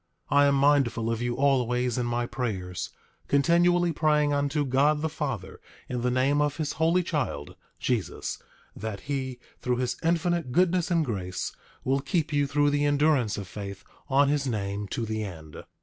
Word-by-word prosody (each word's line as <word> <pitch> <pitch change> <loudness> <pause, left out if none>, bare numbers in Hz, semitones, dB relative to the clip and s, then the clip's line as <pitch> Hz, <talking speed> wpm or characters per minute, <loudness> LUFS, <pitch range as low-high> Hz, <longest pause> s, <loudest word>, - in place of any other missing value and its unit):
8:3 145 - +4
I 145 - +6
am 140 - +3
mindful 135 -5 +3
of 115 0 -2
you 120 0 -1
always 125 -3 +2
in 120 - -1
my 120 0 0
prayers, 105 -8 -3 0.4
continually 170 +4 +3
praying 150 -1 +2
unto 145 +1 0
God 145 +4 +2
the 160 - +1
Father 135 - -4 0.3
in 125 -1 -3
the 125 - +1
name 135 +4 +2
of 150 -1 0
his 155 -3 -2
Holy 165 +3 +2
Child, 140 - -3 0.2
Jesus, 120 -6 -2 0.3
that 110 -3 -5
he, 130 -3 -3 0.2
through 125 -1 0
his 125 -1 -1
infinite 170 -3 +1
goodness 180 +3 +2
and 165 -3 +2
grace, 95 -7 -3 0.3
will 135 +1 +1
keep 155 +3 -1
you 145 -1 +2
through 145 +1 +2
the 145 0 +1
endurance 145 -6 +2
of 100 -2 -5
faith 100 0 -7 0.3
on 140 +1 +4
his 140 -1 +1
name 100 -3 -2
to 115 +4 -3
the 110 0 -2
end. 80 -6 -8
135 Hz, 175 wpm, -27 LUFS, 115-150 Hz, 0.4 s, I